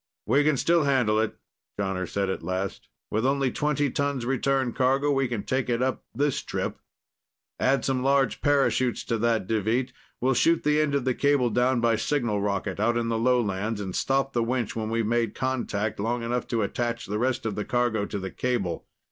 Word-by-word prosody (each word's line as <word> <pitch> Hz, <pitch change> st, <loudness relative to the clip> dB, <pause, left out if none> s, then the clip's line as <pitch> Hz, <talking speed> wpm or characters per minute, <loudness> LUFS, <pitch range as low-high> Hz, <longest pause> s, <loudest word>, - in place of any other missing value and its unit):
"We 135 Hz, +6 st, +3 dB
can 150 Hz, -2 st, +2 dB
still 170 Hz, +2 st, +3 dB
handle 125 Hz, -6 st, +2 dB
it," 110 Hz, 0 st, -1 dB, 0.4 s
Jonner 95 Hz, -2 st, -2 dB
said 100 Hz, -1 st, -1 dB
at -, -, -4 dB
last. 95 Hz, +3 st, -4 dB, 0.2 s
"With 110 Hz, +2 st, 0 dB
only 135 Hz, 0 st, +1 dB
twenty 145 Hz, -1 st, 0 dB
tons 140 Hz, -3 st, -1 dB
return 135 Hz, -1 st, 0 dB
cargo, 135 Hz, +3 st, +2 dB
we 135 Hz, -1 st, +2 dB
can 115 Hz, -4 st, -3 dB
take 130 Hz, -1 st, -1 dB
it 120 Hz, -1 st, +1 dB
up 130 Hz, 0 st, -1 dB
this 145 Hz, +1 st, 0 dB
trip. -, -, -4 dB, 0.8 s
Add 135 Hz, -2 st, +2 dB
some 130 Hz, -1 st, 0 dB
large 135 Hz, -1 st, +2 dB
parachutes 135 Hz, -3 st, +2 dB
to 115 Hz, -, -2 dB
that, 115 Hz, -3 st, +1 dB
Deveet. 115 Hz, +5 st, 0 dB, 0.3 s
We'll 130 Hz, +2 st, +2 dB
shoot 165 Hz, +6 st, +3 dB
the 150 Hz, +1 st, +3 dB
end 145 Hz, -2 st, +1 dB
of 140 Hz, -3 st, 0 dB
the 130 Hz, -, +2 dB
cable 140 Hz, -3 st, +2 dB
down 125 Hz, +2 st, +2 dB
by 115 Hz, -1 st, +3 dB
signal 120 Hz, -8 st, 0 dB
rocket, 100 Hz, -1 st, -2 dB
out 120 Hz, +3 st, +2 dB
in 115 Hz, -1 st, -1 dB
the 115 Hz, -1 st, 0 dB
lowlands, 110 Hz, -3 st, +1 dB
and 95 Hz, -3 st, -4 dB
stop 135 Hz, 0 st, 0 dB
the 120 Hz, -, +1 dB
winch 120 Hz, -1 st, -1 dB
when 110 Hz, -1 st, -2 dB
we've 115 Hz, 0 st, 0 dB
made 115 Hz, +1 st, 0 dB
contact, 110 Hz, -6 st, -2 dB
long 115 Hz, +3 st, -1 dB
enough 120 Hz, +1 st, -2 dB
to 115 Hz, -3 st, 0 dB
attach 120 Hz, +3 st, -2 dB
the 105 Hz, +1 st, -3 dB
rest 125 Hz, -1 st, 0 dB
of 110 Hz, -, -1 dB
the 105 Hz, +1 st, -3 dB
cargo 120 Hz, -4 st, 0 dB
to 105 Hz, -, -4 dB
the 95 Hz, -1 st, -5 dB
cable. 110 Hz, -10 st, -2 dB
120 Hz, 200 wpm, -26 LUFS, 110-135 Hz, 0.8 s, We